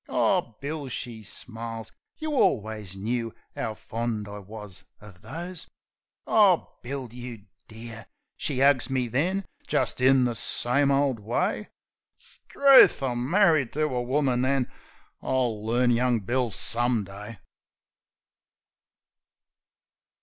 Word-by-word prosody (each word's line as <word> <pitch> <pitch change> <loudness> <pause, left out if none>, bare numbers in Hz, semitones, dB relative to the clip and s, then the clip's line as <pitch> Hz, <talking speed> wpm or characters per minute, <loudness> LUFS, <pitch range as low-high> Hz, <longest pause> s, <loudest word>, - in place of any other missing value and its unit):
"Oh, 115 - +1
Bill!" 145 0 -4
she 115 -2 -5
smiles, 115 +1 -6 0.3
"You 310 -1 -4
alwus 105 - 0
knoo 115 +3 -2 0.2
'ovv 110 -1 -3
fond 115 -2 -3
I 105 0 -7
wus 105 -1 -8 0.2
uv 100 -4 -14
those! 175 +2 -7 0.6
Oh, 200 -5 +4
Bill! 130 0 -5
You 120 -4 -8 0.2
dear\" 115 0 -10 0.3
She 135 -3 -1
'ugs 140 -2 +4
me 130 -2 0
then, 180 - 0 0.2
jist - - +1
in 130 0 +5
the 120 -1 +1
same 125 +5 +1
ole 140 -1 +3
way. 125 - -2 0.5
'Struth! 275 - +5
I'm 125 0 -1
marri'd 165 - +4
to 155 - 0
a 125 - 0
woman, 130 0 +1
an'... 130 -1 +1 0.5
I'll 120 -5 -1
learn 120 +2 +2
young 120 0 +2
Bill 120 +4 0
some 120 +1 0
day! 105 +3 -9
120 Hz, 120 wpm, -26 LUFS, 110-140 Hz, 0.6 s, in